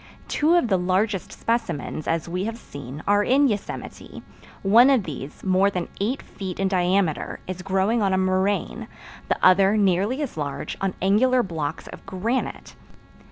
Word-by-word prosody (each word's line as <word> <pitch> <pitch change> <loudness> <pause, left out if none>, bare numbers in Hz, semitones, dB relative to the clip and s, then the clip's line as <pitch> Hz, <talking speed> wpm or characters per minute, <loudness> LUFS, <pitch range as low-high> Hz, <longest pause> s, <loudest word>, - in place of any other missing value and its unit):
Two 315 +3 +2
of 345 -8 +3
the 190 -4 +2
largest 190 +1 0
specimens, 175 -10 -3
as 165 0 -1
we 180 +3 -2
have 225 +1 -4
seen, 140 - -9
are 205 0 +3
in 275 +5 +4
Yosemite; 210 -5 -5 0.4
one 230 +7 +6
of 260 -6 +3
these, 150 -4 -8
more 190 +1 +3
than 180 -3 -4
eight 230 +7 -1
feet 190 -2 -7
in 195 - +2
diameter, 185 -3 0
is 185 0 -6
growing 195 +4 +1
on 195 -2 +2
a 190 - +2
moraine; 190 +2 0 0.4
the - - +2
other, 195 +3 +5
nearly 205 - +1
as 265 - -6
large, 145 -2 -4
on 195 -1 -1
angular 245 +6 +3
blocks 160 -6 -4
of - - -11
granite. 215 +7 -3
195 Hz, 160 wpm, -24 LUFS, 180-220 Hz, 0.4 s, one